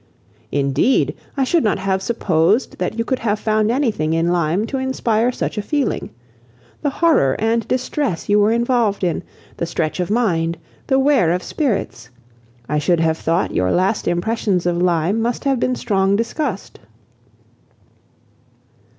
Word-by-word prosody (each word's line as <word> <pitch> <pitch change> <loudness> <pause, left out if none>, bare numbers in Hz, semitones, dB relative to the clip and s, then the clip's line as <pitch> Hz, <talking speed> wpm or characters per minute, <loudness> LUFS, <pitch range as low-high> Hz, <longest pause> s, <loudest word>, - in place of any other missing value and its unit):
"Indeed! 140 - +1 0.2
I 270 - +2
should 330 +5 +2
not 210 - +1
have 190 0 -1
supposed 195 0 +1
that 185 +5 -2
you 230 - -1
could 260 - -1
have 215 -2 0
found 215 0 +1
anything 225 - 0
in 165 +1 +1
Lyme 175 +3 +1
to 270 +3 -3
inspire 245 -3 0
such 230 - -3
a - - 0
feeling. 280 +5 -1 0.7
The 290 - +1
horror 290 - +2
and 225 0 0
distress 255 - -2
you 205 0 +4
were 205 +1 +4
involved 235 -4 +1
in, 175 -2 0 0.4
the 170 - -2
stretch 165 0 -2
of 180 - -1
mind, 170 -8 +1 0.3
the 265 - +3
wear 270 - +3
of 180 +1 -1
spirits! 200 - -2 0.6
I 150 - 0
should 170 +3 +1
have 160 0 +1
thought 165 +3 0
your 90 0 +1
last 190 +4 +1
impressions 185 0 0
of 175 0 0
Lyme 180 +4 +1
must 235 +1 -2
have 270 -3 +1
been 255 +1 0
strong 195 -4 +1
disgust." 230 - -3
205 Hz, 155 wpm, -19 LUFS, 175-240 Hz, 0.7 s, you